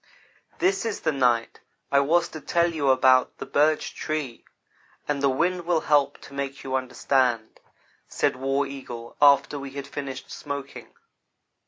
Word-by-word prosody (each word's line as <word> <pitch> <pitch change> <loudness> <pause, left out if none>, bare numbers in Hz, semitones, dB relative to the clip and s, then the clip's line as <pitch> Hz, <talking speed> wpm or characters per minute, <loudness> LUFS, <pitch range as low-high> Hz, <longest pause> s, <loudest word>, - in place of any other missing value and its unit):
"This 375 -3 +1
is 225 -2 -3
the 160 - +1
night 125 -4 +1 0.3
I 140 - +5
was 165 +5 +2
to 155 - -9
tell 170 +2 +1
you 145 -4 0
about 130 -1 +4
the - - -6
Birch 155 +2 +1
Tree, 150 -6 -4 0.6
and 145 -2 -1
the 140 - +3
wind 170 +6 0
will 170 -3 +2
help 145 -2 +2
to - - -13
make 140 0 -5
you 130 - -5
understand," 125 -3 0 0.5
said - - 0
War 135 +2 0
Eagle 125 -4 -8
after 145 0 +5
we 140 0 -7
had 140 0 -6
finished 135 -2 -7
smoking. 140 -1 -7
140 Hz, 155 wpm, -25 LUFS, 130-155 Hz, 0.6 s, I